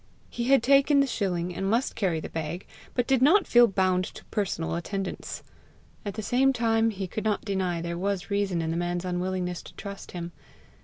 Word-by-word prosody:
He 235 Hz, -, -3 dB
had 270 Hz, -1 st, +4 dB
taken 280 Hz, +2 st, +5 dB
the 275 Hz, -, +5 dB
shilling, 180 Hz, -8 st, -1 dB
and 195 Hz, +2 st, -2 dB
must 235 Hz, +5 st, +1 dB
carry 180 Hz, -6 st, 0 dB
the -, -, -6 dB
bag, 165 Hz, +3 st, -4 dB, 0.3 s
but 245 Hz, -, +2 dB
did 265 Hz, -1 st, +2 dB
not 345 Hz, +8 st, +6 dB
feel 240 Hz, 0 st, +6 dB
bound 185 Hz, -2 st, +2 dB
to -, -, -11 dB
personal 195 Hz, -6 st, -1 dB
attendance. 190 Hz, +3 st, -4 dB, 0.6 s
At 200 Hz, -2 st, -5 dB
the 215 Hz, -, -4 dB
same 260 Hz, +5 st, +3 dB
time 225 Hz, -2 st, +2 dB
he 195 Hz, -3 st, -4 dB
could 210 Hz, +4 st, -4 dB
not 215 Hz, -2 st, 0 dB
deny 185 Hz, -4 st, -1 dB
there 170 Hz, 0 st, -3 dB
was 195 Hz, 0 st, -2 dB
reason 195 Hz, -4 st, 0 dB
in 160 Hz, -, -1 dB
the 165 Hz, -, -1 dB
man's 175 Hz, +1 st, -2 dB
unwillingness 180 Hz, 0 st, -2 dB
to -, -, -14 dB
trust 200 Hz, -1 st, -8 dB
him. 175 Hz, -1 st, -5 dB
195 Hz, 200 wpm, -27 LUFS, 175-230 Hz, 0.6 s, not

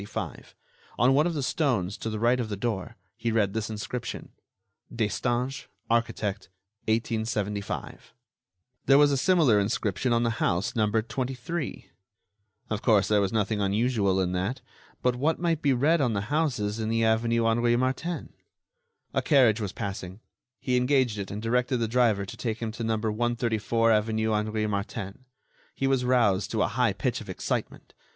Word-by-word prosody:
On 125 Hz, +4 st, +4 dB
one 150 Hz, +4 st, +4 dB
of 170 Hz, -, -2 dB
the 145 Hz, -, -1 dB
stones, 115 Hz, -, 0 dB
to 115 Hz, -, -3 dB
the 110 Hz, -, -3 dB
right 120 Hz, +3 st, +2 dB
of 115 Hz, -3 st, -2 dB
the 105 Hz, -, -3 dB
door, 105 Hz, -4 st, -3 dB, 0.2 s
he 115 Hz, -, -1 dB
read 105 Hz, -3 st, +1 dB
this 110 Hz, -1 st, -2 dB
inscription: 110 Hz, +3 st, -5 dB, 0.6 s
"Destange, 120 Hz, +4 st, -1 dB, 0.2 s
architect, 105 Hz, -4 st, -1 dB, 0.4 s
1875." 110 Hz, -3 st, -2 dB, 0.8 s
There 135 Hz, -, +7 dB
was 145 Hz, 0 st, +5 dB
a -, -, +2 dB
similar 145 Hz, -, +4 dB
inscription 105 Hz, +3 st, -1 dB
on 120 Hz, 0 st, +3 dB
the 115 Hz, -1 st, -1 dB
house 90 Hz, +3 st, 0 dB
numbered 110 Hz, 0 st, +1 dB
23. 130 Hz, +5 st, -4 dB, 0.9 s
Of 105 Hz, 0 st, -1 dB
course, 105 Hz, -5 st, +3 dB
there 105 Hz, -1 st, +4 dB
was 95 Hz, -1 st, 0 dB
nothing 105 Hz, -1 st, 0 dB
unusual 100 Hz, -1 st, +1 dB
in 90 Hz, -1 st, 0 dB
that. 95 Hz, +8 st, -2 dB, 0.4 s
But 125 Hz, -1 st, +2 dB
what 155 Hz, +5 st, +1 dB
might 165 Hz, -2 st, 0 dB
be 140 Hz, -, +3 dB
read 145 Hz, +6 st, +3 dB
on 125 Hz, -4 st, +1 dB
the 105 Hz, +6 st, -3 dB
houses 125 Hz, -9 st, 0 dB
in 110 Hz, 0 st, -2 dB
the 115 Hz, 0 st, +1 dB
avenue 115 Hz, +1 st, +2 dB
Henri 120 Hz, +1 st, +3 dB
Martin? 130 Hz, +8 st, -2 dB, 0.8 s
A -, -, +1 dB
carriage 125 Hz, -7 st, +4 dB
was 100 Hz, -3 st, -3 dB
passing. 95 Hz, -1 st, -6 dB, 0.4 s
He 125 Hz, -1 st, 0 dB
engaged 125 Hz, -4 st, +2 dB
it 100 Hz, -, -4 dB
and 100 Hz, -, -5 dB
directed 125 Hz, +2 st, +1 dB
the 115 Hz, -1 st, 0 dB
driver 110 Hz, -4 st, +2 dB
to -, -, -8 dB
take 115 Hz, -3 st, -2 dB
him 115 Hz, -2 st, -4 dB
to 115 Hz, +1 st, -6 dB
No. 110 Hz, -1 st, 0 dB
134 115 Hz, 0 st, 0 dB
avenue 110 Hz, 0 st, +1 dB
Henri 110 Hz, 0 st, 0 dB
Martin. 100 Hz, +2 st, -4 dB, 0.5 s
He 135 Hz, -, -1 dB
was 135 Hz, -2 st, +2 dB
roused 115 Hz, -6 st, +2 dB
to 110 Hz, -2 st, +1 dB
a -, -, +2 dB
high 115 Hz, -1 st, +1 dB
pitch 125 Hz, +4 st, -2 dB
of 105 Hz, -, -11 dB
excitement. 95 Hz, -, -4 dB
115 Hz, 165 wpm, -27 LUFS, 105-125 Hz, 0.9 s, There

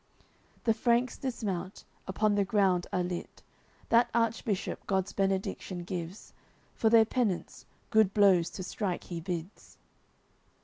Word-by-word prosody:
The 225 Hz, -, +3 dB
Franks 240 Hz, +2 st, +1 dB
dismount, 200 Hz, -8 st, -4 dB, 0.2 s
upon 210 Hz, +2 st, +1 dB
the 205 Hz, 0 st, +2 dB
ground 190 Hz, -3 st, +2 dB
are 180 Hz, -, 0 dB
lit. 175 Hz, 0 st, -6 dB, 0.5 s
That 235 Hz, +1 st, +4 dB
Archbishop 230 Hz, -3 st, -1 dB
God's 190 Hz, -1 st, 0 dB
Benediction 190 Hz, -2 st, -2 dB
gives, 175 Hz, +1 st, -6 dB, 0.4 s
For 220 Hz, -, +2 dB
their 225 Hz, -1 st, +7 dB
penance, 220 Hz, -6 st, -2 dB, 0.2 s
good 220 Hz, -3 st, +4 dB
blows 195 Hz, -5 st, +4 dB
to 185 Hz, -, -4 dB
strike 185 Hz, -1 st, -3 dB
he 170 Hz, -2 st, -6 dB
bids. 175 Hz, +2 st, -6 dB
195 Hz, 125 wpm, -30 LUFS, 180-220 Hz, 0.5 s, their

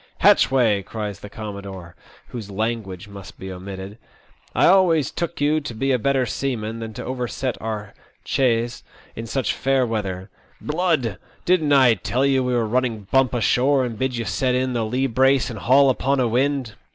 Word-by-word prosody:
*' -, -, -39 dB
Hatchway," 115 Hz, -7 st, +4 dB
cries 105 Hz, 0 st, -6 dB
the 105 Hz, -, -10 dB
commodore, 100 Hz, -5 st, -8 dB, 0.3 s
whose 110 Hz, -5 st, -7 dB
"language" 105 Hz, -2 st, -3 dB
must 100 Hz, -2 st, -11 dB
be 95 Hz, 0 st, -7 dB
omitted, 95 Hz, +3 st, -8 dB, 0.3 s
" -, -, -33 dB
I -, -, +4 dB
always 170 Hz, -6 st, +4 dB
took 170 Hz, 0 st, -4 dB
you 150 Hz, +2 st, +2 dB
to 130 Hz, -6 st, -7 dB
be 135 Hz, +5 st, 0 dB
a 125 Hz, -, +2 dB
better 135 Hz, +1 st, +1 dB
seaman 115 Hz, -4 st, -3 dB
than 115 Hz, -1 st, -6 dB
to 125 Hz, -, -6 dB
overset 125 Hz, 0 st, -3 dB
our 105 Hz, -2 st, -5 dB, 0.3 s
chaise 120 Hz, -2 st, 0 dB, 0.3 s
in 115 Hz, 0 st, -6 dB
such 135 Hz, +2 st, -1 dB
fair 135 Hz, -1 st, +1 dB
weather. 100 Hz, -4 st, -4 dB, 0.3 s
Blood! 150 Hz, -, 0 dB, 0.3 s
Didn't 165 Hz, -5 st, +2 dB
I 130 Hz, -4 st, +6 dB
tell 120 Hz, +7 st, -1 dB
you 135 Hz, -1 st, +2 dB
we 125 Hz, -1 st, 0 dB
were 120 Hz, -2 st, +1 dB
running 115 Hz, -2 st, -1 dB
bump 135 Hz, -2 st, +3 dB
ashore, 130 Hz, +4 st, +2 dB
and 120 Hz, -2 st, -4 dB
bid 130 Hz, -2 st, -1 dB
you 115 Hz, -, -3 dB
set 125 Hz, +3 st, 0 dB
in 130 Hz, 0 st, 0 dB
the 115 Hz, -2 st, 0 dB
lee 130 Hz, +4 st, 0 dB
brace 130 Hz, +1 st, +2 dB
and 110 Hz, -, -7 dB
haul 135 Hz, +4 st, +5 dB
upon 135 Hz, +2 st, 0 dB
a 125 Hz, -, +2 dB
wind?" 130 Hz, 0 st, 0 dB
125 Hz, 185 wpm, -22 LUFS, 110-135 Hz, 0.3 s, I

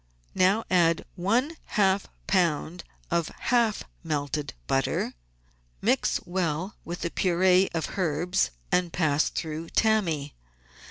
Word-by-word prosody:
Now 195 Hz, +5 st, +3 dB
add 170 Hz, -3 st, +3 dB
one 240 Hz, -, 0 dB, 0.2 s
half 195 Hz, -1 st, +3 dB, 0.2 s
lb. 175 Hz, -2 st, +1 dB, 0.3 s
of 170 Hz, -2 st, +1 dB
half 235 Hz, -3 st, +1 dB, 0.2 s
melted 150 Hz, -, -2 dB
butter, 135 Hz, -, 0 dB, 0.7 s
mix -, -, +1 dB
well 175 Hz, +1 st, -2 dB
with 175 Hz, +1 st, -6 dB
the 170 Hz, -, -2 dB
pur^e 185 Hz, +1 st, +3 dB
of 160 Hz, -, -3 dB
herbs, 170 Hz, -, +1 dB, 0.2 s
and 180 Hz, -1 st, +2 dB
pass 155 Hz, -4 st, +2 dB
through 160 Hz, +1 st, -4 dB
tammy. 170 Hz, -10 st, +1 dB
175 Hz, 110 wpm, -27 LUFS, 160-190 Hz, 0.7 s, Now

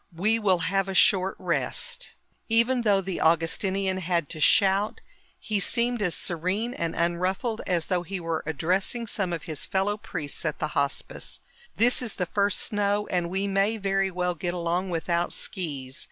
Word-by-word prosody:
"We 215 Hz, +6 st, +2 dB
will 195 Hz, -4 st, +3 dB
have 195 Hz, +1 st, 0 dB
a 190 Hz, -, -3 dB
short 190 Hz, 0 st, +4 dB
rest." -, -, -1 dB, 0.4 s
Even 235 Hz, +3 st, +3 dB
though 205 Hz, -4 st, +3 dB
the 190 Hz, -1 st, -4 dB
Augustinian 185 Hz, +4 st, +1 dB
had 170 Hz, -4 st, -1 dB
to 155 Hz, -, -5 dB
shout, 195 Hz, +6 st, +3 dB, 0.4 s
he 210 Hz, -2 st, 0 dB
seemed 235 Hz, +3 st, +1 dB
as 180 Hz, -4 st, +2 dB
serene 185 Hz, +8 st, -1 dB
and 165 Hz, -7 st, -3 dB
unruffled 185 Hz, +7 st, -1 dB
as 175 Hz, -3 st, +1 dB
though 180 Hz, -2 st, 0 dB
he 190 Hz, +2 st, -4 dB
were 165 Hz, -2 st, -2 dB
addressing 185 Hz, -, 0 dB
some 195 Hz, -4 st, -1 dB
of 165 Hz, -2 st, -3 dB
his 155 Hz, -4 st, -2 dB
fellow 195 Hz, +2 st, 0 dB
priests 145 Hz, -8 st, -4 dB
at 155 Hz, -2 st, -2 dB
the -, -, -2 dB
Hospice. 140 Hz, -1 st, -2 dB, 0.4 s
"This 245 Hz, +3 st, +4 dB
is 240 Hz, -4 st, -3 dB
the 180 Hz, -, -1 dB
first 200 Hz, +2 st, 0 dB
snow 205 Hz, 0 st, 0 dB
and 175 Hz, -2 st, 0 dB
we 190 Hz, +2 st, -1 dB
may 200 Hz, +3 st, +2 dB
very 195 Hz, -1 st, +1 dB
well 180 Hz, -1 st, -1 dB
get 175 Hz, +2 st, -3 dB
along 175 Hz, +2 st, -1 dB
without 170 Hz, 0 st, 0 dB
skis. 140 Hz, -7 st, -4 dB
190 Hz, 170 wpm, -26 LUFS, 170-205 Hz, 0.4 s, short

